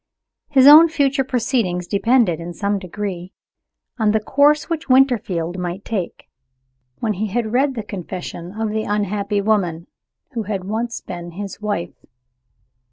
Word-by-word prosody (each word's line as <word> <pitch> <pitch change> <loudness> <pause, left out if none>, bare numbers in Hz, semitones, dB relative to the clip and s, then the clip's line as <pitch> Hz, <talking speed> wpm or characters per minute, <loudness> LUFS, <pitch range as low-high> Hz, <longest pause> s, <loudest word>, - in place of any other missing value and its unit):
His 270 -3 +5
own 310 +4 +10
future 280 -3 +1
proceedings 225 -8 -1
depended, 200 -2 +2
in 170 +1 -7
some 200 -1 -1
degree, 185 -1 -6 0.7
on 215 -1 +2
the 220 - +3
course 285 +7 +3
which 330 -3 -4
Winterfield 205 -10 +2
might 180 +2 -5
take, 200 -6 -4 0.7
when 220 -2 -1
he 210 +3 -2
had 220 +2 -2
read 270 +2 +2
the 225 - -4
confession 180 -1 -7
of 220 -1 -1
the 220 0 -1
unhappy 205 0 -1
woman 185 -6 0 0.5
who 235 -4 -3
had 200 -3 -4
once 225 +4 -3
been 175 -1 -8
his 200 +3 -7
wife. 205 -5 -4
210 Hz, 145 wpm, -20 LUFS, 185-245 Hz, 0.7 s, own